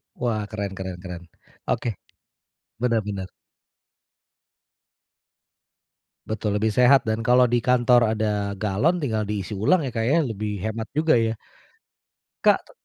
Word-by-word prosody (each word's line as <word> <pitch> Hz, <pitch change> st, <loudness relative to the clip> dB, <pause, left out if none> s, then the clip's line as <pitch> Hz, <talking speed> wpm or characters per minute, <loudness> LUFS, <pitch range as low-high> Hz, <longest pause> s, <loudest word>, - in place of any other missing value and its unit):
Wah, 115 Hz, -4 st, -1 dB
keren 100 Hz, -2 st, -4 dB
keren 95 Hz, -2 st, -5 dB
keren, 90 Hz, -1 st, -7 dB, 0.4 s
oke, 120 Hz, -, -1 dB, 0.9 s
benar 115 Hz, -2 st, +1 dB
benar. 95 Hz, -2 st, -5 dB, 3.0 s
Betul, 105 Hz, -1 st, -1 dB
lebih 110 Hz, 0 st, 0 dB
sehat 125 Hz, -1 st, +5 dB
dan 110 Hz, +1 st, -1 dB
kalau 125 Hz, +1 st, +5 dB
di 120 Hz, 0 st, 0 dB
kantor 125 Hz, -1 st, +4 dB
ada 105 Hz, -2 st, -1 dB
galon 110 Hz, -, +1 dB
tinggal 110 Hz, -7 st, -1 dB
diisi 105 Hz, 0 st, -4 dB
ulang 115 Hz, -, +3 dB
ya, 120 Hz, -, -7 dB
Kak, 115 Hz, -, 0 dB
ya 165 Hz, -, +4 dB
lebih 105 Hz, -2 st, -4 dB
hemat 110 Hz, +3 st, -4 dB
juga 155 Hz, -1 st, +2 dB
ya. 115 Hz, -1 st, +1 dB, 1.1 s
Kak -, -, +5 dB
t -, -, -17 dB
110 Hz, 130 wpm, -24 LUFS, 105-120 Hz, 3.0 s, sehat